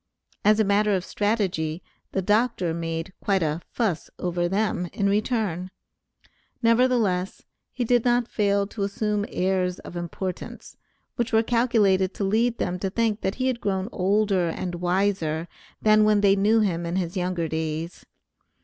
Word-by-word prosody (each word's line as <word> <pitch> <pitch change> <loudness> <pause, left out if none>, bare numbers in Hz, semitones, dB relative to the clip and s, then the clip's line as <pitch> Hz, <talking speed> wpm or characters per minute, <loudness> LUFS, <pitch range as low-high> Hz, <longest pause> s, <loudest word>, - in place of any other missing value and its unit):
As 210 +1 +4
a - - +5
matter 205 0 +2
of 185 -1 -2
strategy, 190 -7 -1 0.3
the 190 - -1
doctor 210 -4 +1
made 165 +1 -4
quite 195 -3 +2
a 155 +2 -1
"fuss" 205 -9 -1
over 175 -1 -1
them 195 -2 0
in 200 - 0
return; 205 -4 0 0.9
nevertheless, 230 -6 +2 0.3
he 250 - -2
did 240 0 +3
not 240 -1 +2
fail 200 -3 +1
to 205 +1 -8
assume 205 +1 -1
airs 185 -1 0
of - - -10
importance, 175 +2 -6 0.4
which 240 -1 -1
were 225 0 +4
calculated 215 -6 +2
to - - -3
lead 225 +4 +1
them 180 0 -2
to 195 - -1
think 220 +1 0
that 190 - -1
he 255 - -2
had 255 -2 -1
grown 190 0 -1
older 195 -2 +1
and 175 +2 -4
wiser 175 -3 0 0.4
than 215 0 +5
when 210 -1 +4
they 200 -1 +5
knew 215 +3 +3
him 175 -5 0
in 170 - -2
his 180 -1 -2
younger 180 -2 -1
days. 160 +1 -4
195 Hz, 160 wpm, -25 LUFS, 180-215 Hz, 0.9 s, a